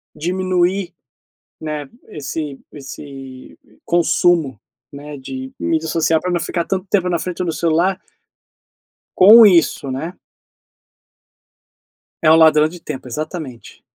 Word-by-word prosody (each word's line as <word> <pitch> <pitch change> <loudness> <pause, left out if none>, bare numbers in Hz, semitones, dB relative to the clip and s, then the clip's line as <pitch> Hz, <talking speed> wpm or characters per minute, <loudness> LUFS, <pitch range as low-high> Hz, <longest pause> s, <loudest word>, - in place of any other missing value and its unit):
diminuir, 185 +1 -1 0.7
né, 150 -2 -5 0.2
esse 150 -3 -6
esse 135 -2 -11 0.3
consumo, 170 -6 +1 0.3
né, 145 +1 -9
de 260 - -8
mídia 160 0 -1
social 160 0 +1
pra 180 - -3
não 175 - 0
ficar 170 0 -3
tanto 190 0 -3
tempo 190 -3 +1
na 170 -2 0
frente 180 +1 -4
do 170 - -2
celular 175 +4 0 1.2
Com 220 +5 +9
isso, 170 -7 +3
né. 155 +7 -5 2.1
É 155 - +5
um - - +7
ladrão 155 -1 +5
de 175 +1 -11
tempo, 145 -5 -7
exatamente. 150 -1 -7
165 Hz, 115 wpm, -18 LUFS, 150-180 Hz, 2.1 s, Com